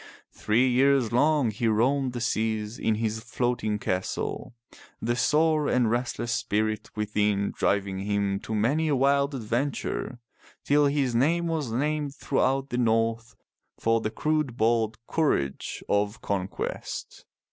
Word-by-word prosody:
Three 120 +5 +2
years 130 -1 +3
long 140 0 +3
he 115 +2 -1
roamed 125 +4 +2
the 120 - -4
seas 110 -1 -1
in 110 - +1
his 110 0 -2
floating 120 -2 -1
castle, 95 +4 -3 0.4
the 120 +1 -1
sore 155 +2 +2
and 120 -3 +2
restless 120 0 -2
spirit 110 -2 -1
within 105 -1 0
driving 100 -1 0
him 100 0 -1
to 110 - -5
many 140 +10 +1
a 145 - +2
wild 140 +1 +2
adventure, 125 +1 -2 0.5
till 145 0 +4
his 140 -3 0
name 160 +8 +2
was 160 -7 -2
named 145 +3 -1
throughout 135 -1 0
the 125 - -2
North 115 0 0 0.4
for 115 0 +1
the 110 - -1
crude 150 +1 -1
bold 110 -1 +1
courage 95 - -1
of 105 +2 0
con 95 -2 -2
quest. - - -6
120 Hz, 135 wpm, -26 LUFS, 110-140 Hz, 0.5 s, till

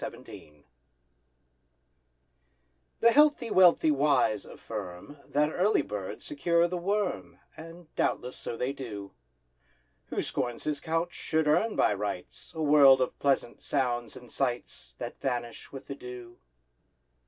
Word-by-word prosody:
THE - - -2
GARTER 75 -1 -14 2.4
The 235 - +6
healthy 295 -4 +4
wealthy 175 -4 +6
wise, 140 -7 +2
affirm, 105 +5 -8
That 150 +1 +1
early 195 +4 +2
birds 100 -2 -6
secure 170 +4 +2
the 180 - -4
worm, 200 +2 -2 0.2
And 165 +1 -12
doubtless 125 +1 -1
so 115 - -6
they 125 +3 -1
do; 105 -8 -7 1.0
Who - - -2
scorns 120 -1 -3
his 150 -2 -1
couch 165 +3 -2
should 160 -1 -1
earn, 215 +9 +2
by - - +3
rights, - - -5
A 160 - -2
world 145 -3 +7
of 130 - -2
pleasant 135 -4 0
sounds 120 -4 -1
and 125 -2 -12
sights 120 - -3
That - - -7
vanish 120 -3 -4
with 135 - -9
the - - -6
dew. 125 -3 -10
140 Hz, 130 wpm, -29 LUFS, 120-165 Hz, 2.4 s, world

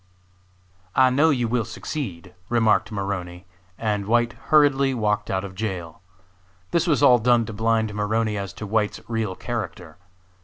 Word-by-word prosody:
"I 130 -1 +5
know 145 +5 +4
you 125 -5 +1
will 120 0 0
succeed," 105 - -6 0.2
remarked 115 -3 +2
Maroney, 95 -3 -4 0.3
and 105 -3 -2
White 120 +1 +2
hurriedly 140 -3 +4
walked 105 -3 0
out 95 0 -1
of 95 -1 -7
jail. 95 -6 -5 0.7
This 170 +1 +1
was 150 -7 +2
all 125 -1 +7
done 120 0 +3
to 110 - -7
blind 110 0 0
Maroney 105 +1 0
as 100 -2 -4
to 110 - -7
White's 105 0 0
real 110 -5 -2
character. 95 -9 -6
110 Hz, 150 wpm, -23 LUFS, 100-120 Hz, 0.7 s, all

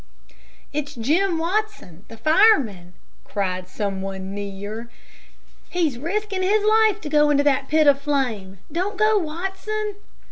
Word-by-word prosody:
"It's 295 0 -3
Jim 330 +10 +1
Watson, 340 - -3
the 225 - -12
fireman," 235 - +3 0.3
cried 185 -3 -3
some 195 0 -3
one 190 0 -5
near. 205 +3 -6 0.8
"He's 320 -9 -1
risking 390 +5 -2
his 410 +3 +2
life 435 -1 +4
to - - -6
go 295 0 +3
into 285 -1 +3
that 275 -2 +2
pit 310 0 +3
of 280 -1 +5
flame. 240 -10 -2
Don't 375 +6 -2
go, 430 0 +4
Watson." 385 +5 -4
295 Hz, 135 wpm, -22 LUFS, -, 0.8 s, of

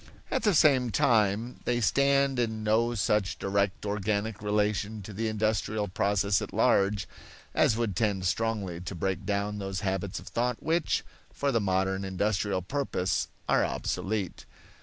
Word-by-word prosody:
At 265 - +1
the 210 -5 +3
same 135 -5 +5
time 110 +2 +2
they 120 0 +1
stand 140 +3 +3
in 110 -2 -1
no 115 +2 +2
such 100 -1 +1
direct 100 0 -1
organic 105 +1 -1
relation 105 0 0
to 105 - -8
the 110 +3 -2
industrial 110 -1 0
process 100 +1 +1
at - - -5
large 100 +1 +2 0.5
as 110 - +3
would 115 -5 -1
tend 100 -3 0
strongly 100 -3 -1
to 95 +1 -6
break 95 +2 -2
down 105 0 -1
those 95 -1 -3
habits 95 -1 -2
of - - -14
thought 120 0 -1
which, 165 +1 +1 0.3
for 140 0 -1
the 115 - +2
modern 95 0 0
industrial 95 0 -1
purpose, 95 -6 -1 0.2
are - - +3
obsolete. 100 -3 -3
105 Hz, 150 wpm, -28 LUFS, 95-115 Hz, 0.5 s, same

